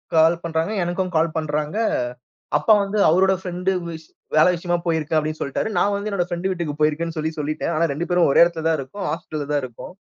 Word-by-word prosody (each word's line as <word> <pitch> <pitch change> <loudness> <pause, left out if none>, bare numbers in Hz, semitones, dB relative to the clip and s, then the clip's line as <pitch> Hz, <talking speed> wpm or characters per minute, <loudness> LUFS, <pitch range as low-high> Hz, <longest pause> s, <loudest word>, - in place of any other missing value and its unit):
கால் 165 +1 +5
பண்றாங்க, 165 +3 -1
எனக்கும் 180 +1 -2
கால் 160 0 +1
பண்றாங்க. 150 +3 -2 0.8
அப்பா 150 +9 +4
வந்து 200 +2 -3
அவரோட 190 +4 +4
ஃப்ரெண்ட் 180 0 -3 0.2
விஷ் 160 -1 -8 0.3
வேல 155 - +7
விஷயமா 175 0 -1
போயிருக்க 160 -2 -1
அப்டின்னு 155 +1 -4
சொல்லிட்டாரு. 140 +10 -2
நான் 205 - +2
வந்து 200 +1 -3
என்னோட 185 -3 0
ஃப்ரெண்ட் 175 +2 -2
வீட்டுக்கு 170 -5 -3
போயிருக்கேன்னு 160 +2 0
சொல்லி, 155 +1 -1
சொல்லிட்டேன். 155 +3 -2
ஆனா, 165 +2 +2
2 165 +5 -3
பேரும் 175 -3 +3
ஒரே - - +6
எடத்துல 170 -2 -1
தான் 165 -1 +2
இருக்கோம். 135 +10 -5
ஹாஸ்பிட்டல்ல 155 -4 -5
தான் 145 - +2
இருக்கோம். 120 +7 -10
165 Hz, 195 wpm, -22 LUFS, 155-180 Hz, 0.8 s, வேல